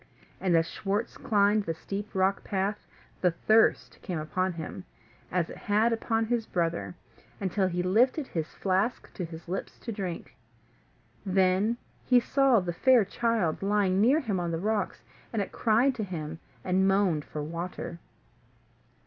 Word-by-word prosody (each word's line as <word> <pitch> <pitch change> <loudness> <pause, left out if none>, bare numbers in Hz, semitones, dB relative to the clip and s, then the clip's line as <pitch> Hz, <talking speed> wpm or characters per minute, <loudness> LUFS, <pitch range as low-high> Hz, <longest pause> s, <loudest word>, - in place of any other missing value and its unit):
And 185 -3 +2
as 165 0 +2
Schwartz 205 +6 -2
climbed 205 -1 +2
the 165 - -2
steep 200 +5 -6
rock 190 +1 +2
path, 200 +1 -2 0.3
the 180 - +4
thirst 215 +6 +2
came 180 -4 -4
upon 185 +4 -1
him, 165 +2 -6 0.5
as 175 -2 +1
it - - -9
had 215 +3 +2
upon 225 0 0
his 230 -1 -1
brother, 170 0 -1 0.4
until 190 0 0
he 180 0 -1
lifted 245 - +3
his 160 -9 -3
flask 195 +5 -1
to 185 - -4
his 165 0 -8
lips 185 +3 -4
to 235 - -6
drink. 190 -5 -5 0.9
Then 190 +3 +2 0.3
he 250 -1 +5
saw 265 -1 +3
the 175 -1 -3
fair 245 +3 +5
child 220 -6 0
lying 195 -1 +2
near 270 +8 +4
him 210 -8 -1
on 175 -1 -2
the 165 - -1
rocks, 210 +2 -1 0.3
and 225 - -1
it 195 -2 -2
cried 235 +4 +3
to 230 -4 -3
him, 160 -4 -5 0.2
and 190 +1 +2
moaned 195 -6 +2
for 150 0 -6
water. 170 +2 -5
195 Hz, 155 wpm, -28 LUFS, 175-220 Hz, 0.9 s, he